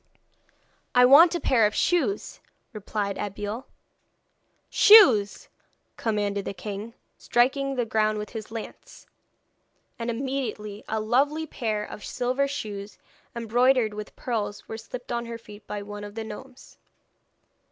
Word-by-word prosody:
'I 250 Hz, 0 st, +7 dB
want 325 Hz, +7 st, +8 dB
a -, -, 0 dB
pair 230 Hz, -9 st, +3 dB
of 210 Hz, -, -6 dB
shoes,' 270 Hz, -, 0 dB, 0.3 s
replied 205 Hz, -1 st, -3 dB
Abeille. 205 Hz, +5 st, -5 dB, 1.0 s
'Shoes!' 380 Hz, -, +6 dB, 0.5 s
commanded 205 Hz, -2 st, -1 dB
the 195 Hz, -, -5 dB
king, 205 Hz, +4 st, -7 dB, 0.2 s
striking 270 Hz, +3 st, +1 dB
the 245 Hz, -2 st, 0 dB
ground 215 Hz, -1 st, +1 dB
with 210 Hz, 0 st, -6 dB
his 220 Hz, -3 st, -7 dB
lance; 225 Hz, 0 st, -9 dB, 0.9 s
and 230 Hz, 0 st, -3 dB
immediately 235 Hz, -5 st, -4 dB
a 220 Hz, -, -1 dB
lovely 280 Hz, +8 st, +1 dB
pair 215 Hz, -7 st, -3 dB
of 210 Hz, -, -10 dB
silver 255 Hz, +3 st, -1 dB
shoes 205 Hz, -6 st, -6 dB, 0.4 s
embroidered 235 Hz, 0 st, +2 dB
with 210 Hz, 0 st, -8 dB
pearls 215 Hz, -4 st, -4 dB
were 220 Hz, -, -6 dB
slipped 245 Hz, +3 st, -8 dB
on 235 Hz, 0 st, -2 dB
her 230 Hz, 0 st, -5 dB
feet 215 Hz, -2 st, -14 dB
by 205 Hz, -1 st, -5 dB
one 205 Hz, 0 st, -8 dB
of 205 Hz, 0 st, -9 dB
the 225 Hz, -, -4 dB
gnomes. 250 Hz, +4 st, -11 dB
225 Hz, 130 wpm, -26 LUFS, 210-255 Hz, 1.0 s, want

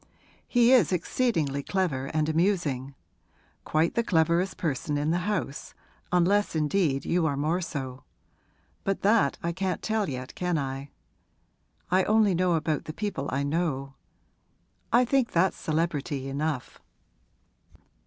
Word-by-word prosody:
He 240 Hz, 0 st, +4 dB
is 240 Hz, -, +5 dB
exceedingly 170 Hz, -, 0 dB
clever 145 Hz, -6 st, -1 dB
and 155 Hz, +1 st, 0 dB
amusing 155 Hz, -6 st, 0 dB, 0.7 s
quite 160 Hz, +2 st, +1 dB
the 235 Hz, -, +2 dB
cleverest 170 Hz, 0 st, +1 dB
person 145 Hz, -2 st, -1 dB
in 150 Hz, +2 st, 0 dB
the 175 Hz, -, +1 dB
house, 190 Hz, -8 st, -3 dB, 0.4 s
unless 180 Hz, +2 st, +2 dB
indeed 150 Hz, -3 st, +1 dB
you 170 Hz, -2 st, +1 dB
are 140 Hz, -2 st, -1 dB
more 160 Hz, +6 st, 0 dB
so. 130 Hz, -6 st, -5 dB, 0.8 s
But 195 Hz, 0 st, -2 dB
that 205 Hz, -7 st, +3 dB
I 170 Hz, -, 0 dB
can't 185 Hz, -1 st, -2 dB
tell 215 Hz, -4 st, 0 dB
yet, 130 Hz, -1 st, -6 dB
can 180 Hz, -2 st, -1 dB
I? 135 Hz, 0 st, -4 dB, 1.0 s
I 185 Hz, 0 st, +4 dB
only 215 Hz, -2 st, +4 dB
know 180 Hz, 0 st, +2 dB
about 155 Hz, -2 st, -1 dB
the 155 Hz, -, -6 dB
people 200 Hz, -8 st, -3 dB
I 140 Hz, +2 st, 0 dB
know; 140 Hz, -3 st, -1 dB, 1.0 s
I 245 Hz, +2 st, +5 dB
think 260 Hz, -1 st, +1 dB
that's 175 Hz, +3 st, +2 dB
celebrity 150 Hz, -4 st, -2 dB
enough!' 140 Hz, -1 st, -3 dB
165 Hz, 135 wpm, -27 LUFS, 140-190 Hz, 1.0 s, is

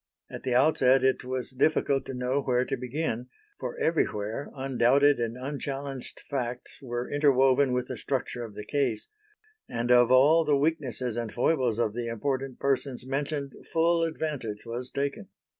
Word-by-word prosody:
At -, -, -7 dB
the 125 Hz, -2 st, -1 dB
outset 130 Hz, -1 st, +4 dB
it 130 Hz, 0 st, +2 dB
was 130 Hz, +1 st, -3 dB
difficult 135 Hz, 0 st, +1 dB
to 135 Hz, -, -5 dB
know 125 Hz, +3 st, 0 dB
where 125 Hz, -1 st, +1 dB
to -, -, -2 dB
begin, 125 Hz, -1 st, -3 dB, 0.3 s
for 125 Hz, -2 st, -5 dB
everywhere 115 Hz, -6 st, -1 dB
undoubted 135 Hz, +1 st, +3 dB
and 115 Hz, 0 st, -2 dB
unchallenged 135 Hz, 0 st, -5 dB
facts 125 Hz, -3 st, -4 dB
were 120 Hz, -2 st, -4 dB
interwoven 135 Hz, -2 st, +4 dB
with 125 Hz, 0 st, -1 dB
the -, -, -5 dB
structure 130 Hz, -3 st, -3 dB
of 110 Hz, -3 st, -9 dB
the 105 Hz, -, -7 dB
case; 130 Hz, -7 st, -1 dB, 0.6 s
and 120 Hz, +1 st, -1 dB
of 120 Hz, 0 st, +6 dB
all 145 Hz, +6 st, +6 dB
the 150 Hz, -2 st, +3 dB
weaknesses 135 Hz, -6 st, -1 dB
and 115 Hz, -2 st, -3 dB
foibles 125 Hz, -3 st, +1 dB
of 110 Hz, -3 st, 0 dB
the 120 Hz, 0 st, -3 dB
important 130 Hz, +3 st, -2 dB
persons 135 Hz, -2 st, -1 dB
mentioned, 140 Hz, +1 st, -3 dB, 0.2 s
full 165 Hz, +1 st, +3 dB
advantage 150 Hz, -10 st, -3 dB
was 120 Hz, +2 st, -4 dB
taken. 140 Hz, +10 st, -3 dB
130 Hz, 160 wpm, -28 LUFS, 120-140 Hz, 0.6 s, of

